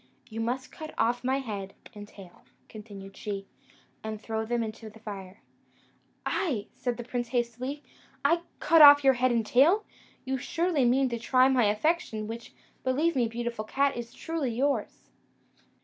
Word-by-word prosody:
You 220 - -5
must 250 +3 -3
cut 310 -1 -9
off 245 +2 +1
my 260 +1 +1
head 205 -7 -5 0.2
and 205 -1 -9
tail," 190 -4 -15 0.2
continued 200 -3 -10
she, 200 -2 -5 0.6
"and 220 -1 -4
throw 220 0 -3
them 240 0 0
into 220 0 -7
the 215 - -15
fire." 200 -3 -9 0.8
"I!" 260 - -1
said 245 -2 -3
the 240 - -5
prince, 245 0 -3
hastily 245 +4 -2 0.4
"I 335 +4 +4 0.2
cut 325 +1 +5
off 290 -1 +10
your 270 -1 +6
head 255 0 +2
and 230 -2 +1
tail! 330 - +4 0.4
You 265 0 -1
surely 330 -2 0
mean 260 +2 +3
to 235 -1 -3
try 255 +2 +4
my 255 -4 +3
affection, 215 0 0
which, 230 +2 -7 0.3
believe 290 +6 +1
me, 245 -3 +2
beautiful 235 -1 -4
cat, 275 +5 +1
is 235 -1 -6
truly 325 -5 -3
yours." 275 +5 -2
240 Hz, 165 wpm, -28 LUFS, 220-270 Hz, 0.8 s, off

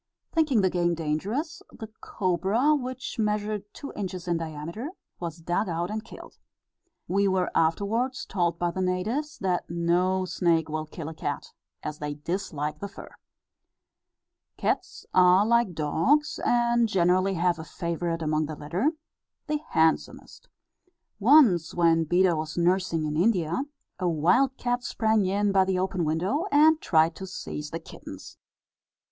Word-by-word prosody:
Thinking 310 -9 +2
the 185 -1 +2
game 175 -1 +1
dangerous, 195 - -3
the 225 - -8 0.2
cobra, 195 - +1
which 255 -4 -4
measured 210 -1 -1
two 280 - -9
inches 185 -3 -5
in 170 -1 +1
diameter, 165 - -5 0.3
was 170 -2 -5
dug 175 +4 -1
out 170 +3 -2
and 215 0 -3
killed. 225 - -13 0.7
We 200 +3 +2
were 185 -1 +1
afterwards 220 +11 0
told 175 -3 0
by 175 0 0
the 190 - -3
natives, 220 +12 -1
that 185 -2 -1
no 180 +2 +1
snake 165 -3 +1
will 155 0 -3
kill 155 0 -7
a 160 - -6
cat, 145 -2 -4 0.3
as 150 0 -5
they 150 -1 -4
dislike 150 -2 -4
the 200 - -4
fur." 200 - -12 1.5
Cats - - -2
are 185 +2 +6
like 235 -4 +2
dogs, 170 - +1
and 235 -1 +2
generally 185 +1 +2
have 175 -1 +1
a - - -5
favourite 170 0 -3
among 155 0 0
the 155 - -5
litter, 180 - -1 0.5
the 300 -1 -1
handsomest. 160 0 0 0.7
Once 210 - +5
when 165 -2 +3
Beda 175 +2 +3
was 155 +1 -4
nursing 175 -2 +1
in 150 0 -2
India, 180 - +1 0.3
a 180 -2 +1
wild 180 - +2
cat 245 0 -1
sprang 220 -4 +1
in 200 +2 +1
by 195 -1 +4
the 190 -1 0
open 185 -1 -1
window, 180 - 0
and 310 +2 +5
tried 160 0 +3
to 190 - -7
seize 150 -5 -6
the 165 - -4
kittens. - - -11
185 Hz, 150 wpm, -26 LUFS, 165-220 Hz, 1.5 s, are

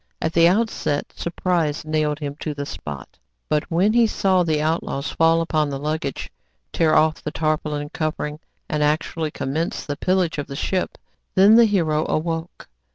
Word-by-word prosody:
At 160 - -2
the 165 0 +6
outset 185 -7 0
surprise 170 -3 -1
nailed 155 -1 0
him 145 -2 -5
to 150 -2 -4
the 145 0 -4
spot. 75 - -8 0.3
But 150 -1 0
when 185 +6 +2
he 235 -1 +5
saw 190 -3 +2
the 160 -3 +1
outlaws 155 -2 -1
fall 165 0 +3
upon 155 -3 0
the 140 - -3
luggage, 150 -1 -3 0.4
tear 160 -2 +3
off 155 0 +3
the - - -2
tarpaulin 150 -1 -2
covering, 155 -1 -3 0.3
and 150 -2 -1
actually 155 +1 0
commence 150 +3 -3
the 145 - -3
pillage 180 -4 +1
of 145 - -4
the 140 - -7
ship, 185 +5 -2 0.4
then 195 +3 +7
the 235 +1 +8
hero 160 -7 +1
awoke. 165 +1 -3
155 Hz, 165 wpm, -22 LUFS, 150-170 Hz, 0.4 s, the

